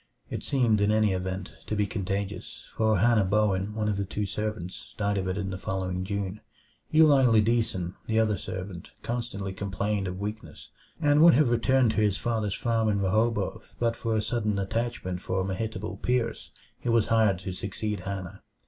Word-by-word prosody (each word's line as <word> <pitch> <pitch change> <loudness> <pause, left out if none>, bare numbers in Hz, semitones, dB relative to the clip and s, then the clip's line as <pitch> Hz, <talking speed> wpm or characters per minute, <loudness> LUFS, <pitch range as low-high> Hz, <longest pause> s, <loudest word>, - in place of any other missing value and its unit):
It - - -3
seemed, 115 -6 +2
in 100 +1 +3
any 110 -2 +3
event, 95 0 -3 0.2
to 105 - -1
be 105 0 +2
contagious; 100 -1 -4
for 110 -2 +3
Hannah 115 +1 +4
Bowen, 100 0 +1
one 110 -1 -1
of 105 -2 0
the 100 - 0
two 105 +2 -3
servants, 105 -3 -5
died 100 0 0
of 95 - -2
it 95 +1 -1
in 100 -1 -2
the 95 - -5
following 95 -1 -2
June. 100 +1 -3 0.5
Eli 155 -3 +6
Lideason, 110 -6 +2
the 110 0 +2
other 110 -2 +3
servant, 95 -1 -6
constantly 115 -5 -3
complained 100 +1 -2
of 90 0 -5
weakness; 105 +2 -6 0.3
and 145 -1 +4
would 170 -3 +8
have 140 -3 +4
returned 120 +1 +3
to - - -5
his 105 -2 +2
father's 110 -1 -1
farm 115 -2 +1
in 100 -1 +1
Rehoboth 105 +1 0
but 115 -1 +1
for 115 -1 -1
a 105 - +1
sudden 105 -4 0
attachment 95 -3 -2
for 95 -1 -1
Mehitabel 100 +1 -3
Pierce, 120 +1 -1 0.3
who 120 - 0
was 115 -2 +4
hired 110 -4 +4
to 95 0 -4
succeed 100 +2 -3
Hannah. 95 -1 -6
105 Hz, 180 wpm, -27 LUFS, 95-115 Hz, 0.5 s, would